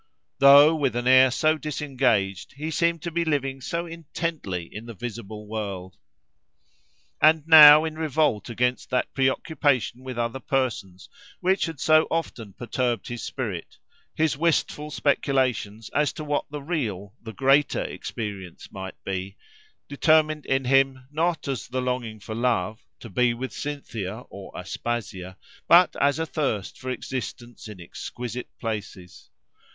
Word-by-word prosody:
—Though 140 +3 +8
with 135 -6 0
an 120 0 -2
air 130 0 +7
so 155 +5 +1
disengaged, 130 - -1
he 155 +3 -5
seemed 170 0 0
to 170 - -4
be 170 +1 0
living 135 -4 -1
so 170 +6 -3
intently 165 - -4
in 110 +2 -8
the 115 - -8
visible 110 -2 -7
world! 100 -4 -5 1.3
And 155 0 +4
now, 155 -1 +10
in 160 -1 -4
revolt 150 -8 0
against 125 +2 -1
that 125 - -1
pre 130 -1 +3
occupation 130 -3 -1
with 130 -2 -6
other 120 +2 -2
persons, 120 -10 -2 0.3
which 190 +2 +1
had 160 -4 -7
so 155 +2 +4
often 120 -11 -4
perturbed 120 -1 -2
his 120 -1 -5
spirit, 105 -11 -5 0.4
his 155 -2 +1
wistful 150 -1 0
speculations 130 -7 0
as 150 0 +1
to 155 - -7
what 145 -1 -2
the 145 -1 -7
real, 105 - -3
the 110 - -8
greater, 135 +3 +3
experience 100 -6 -7
might 95 -1 -7
be, 95 +1 -4 0.5
determined 155 +1 +2
in 135 0 +1
him, 135 0 +2
not 165 +1 -1
as 135 -3 -3
the 130 +1 -3
longing 125 -4 -3
for 110 - -7
love—to 115 0 -2
be 120 +4 +2
with 130 +2 -6
Cynthia, 115 -8 -5
or 100 -1 -10
Aspasia—but 100 - 0
as 140 0 +2
a 160 - -1
thirst 135 - -3
for 130 - -6
existence 120 -2 -6
in 105 -3 -10
exquisite 120 +7 -7
places. 105 -5 -6
130 Hz, 140 wpm, -25 LUFS, 110-150 Hz, 1.3 s, now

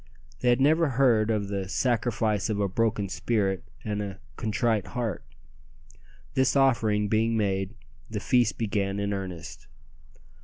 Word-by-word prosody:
They 125 - +2
had 120 +1 +4
never 155 +3 +4
heard 120 -4 +3
of 105 -3 0
the 100 -2 -3
"sacrifice 115 -2 0
of 105 -2 -1
a 100 - +2
broken 105 +1 0
spirit 95 -2 -1 0.2
and 105 -1 -2
a 100 -2 -6 0.2
contrite 110 - 0
heart." 115 - -2 1.1
This 130 0 +2
offering 110 -6 +3
being 115 +2 +1
made, 95 0 -1 0.3
the 110 -1 -3
feast 120 0 +2
began 100 -2 -1
in 100 0 -1
earnest. 95 -4 -6
110 Hz, 140 wpm, -27 LUFS, 100-120 Hz, 1.1 s, had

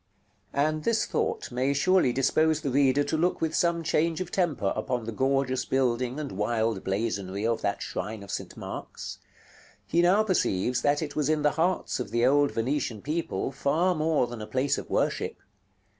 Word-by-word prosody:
§ - - -45 0.6
LXXXI. 145 - +4
And 155 0 -3
this 230 +3 +2
thought - - -2
may 130 +3 +1
surely 185 -2 +3
dispose 155 +4 +2
the 140 - -2
reader 140 +1 +3
to 160 - -2
look 175 +3 +1
with 160 -1 -1
some 170 -1 +1
change 165 +1 +1
of 185 -2 -4
temper 150 - 0
upon 120 +2 -2
the 115 - -4
gorgeous 130 +2 +1
building 130 0 0
and 150 -2 -4
wild 110 +1 -1
blazonry 100 0 -2
of 115 0 0
that - - -1
shrine 105 +2 -5
of 100 - -9
St. - - -5
Mark's. - - -7 0.7
He 170 - +2
now 190 +5 +4
perceives 125 - +1
that 145 +2 +2
it 145 - -6
was 150 -1 0
in 155 -1 +1
the 150 - +4
hearts 170 0 0
of 120 -5 -4
the 120 +2 +2
old 145 +2 +4
Venetian 120 -2 -2
people 155 -2 -2
far 155 +7 +1
more 155 -4 +1
than 120 -2 -7
a 105 - -6
place 135 +2 0
of - - -9
worship. - - 0
140 Hz, 190 wpm, -27 LUFS, 120-155 Hz, 0.7 s, LXXXI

